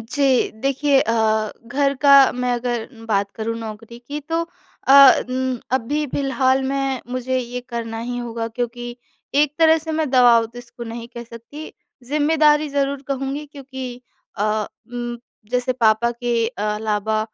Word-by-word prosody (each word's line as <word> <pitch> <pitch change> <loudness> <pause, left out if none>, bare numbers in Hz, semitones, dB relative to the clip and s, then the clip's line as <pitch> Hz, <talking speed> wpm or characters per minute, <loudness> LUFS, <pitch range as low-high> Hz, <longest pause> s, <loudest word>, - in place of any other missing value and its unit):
जी। 265 +2 +1
देखिए 275 0 +2
अ, 220 -1 +1 0.2
घर 275 +2 +1
का 280 -2 +7
मैं 250 0 -1
अगर 240 -1 -3 0.2
बात 200 -1 +1
करूँ 230 +1 -3
नौकरी 225 +1 -8
की 295 +1 -3
तो 330 +3 -2 0.5
अ 275 0 +9
उम, 255 -1 -1
अभी 290 +4 0
फिलहाल 265 0 +1
में 270 -1 -1
मुझे 255 +1 -1
ये 250 0 -4
करना 230 -2 -4
ही 245 +1 -4
होगा, 230 -1 -4
क्योंकि 240 +1 -5 0.4
एक 295 0 +3
तरह 320 0 +5
से 320 0 -5
मैं 310 -2 0
दबाव 245 -3 +6
तो 240 +2 -12
इसको 240 0 -10
नहीं 230 +1 -7
कह 235 -1 -8
सकती, 235 +7 -10 0.4
ज़िम्मेदारी 300 0 +3
ज़रूर 280 0 -1
कहूँगी 275 +2 -3
क्योंकि 265 -3 -8 0.4
अ 215 +1 0 0.3
उम, 240 0 -4 0.3
जैसे 250 +1 0
पापा 235 -1 +2
के 235 -1 -1 0.2
अलावा 215 0 -1
250 Hz, 150 wpm, -21 LUFS, 230-275 Hz, 0.5 s, अ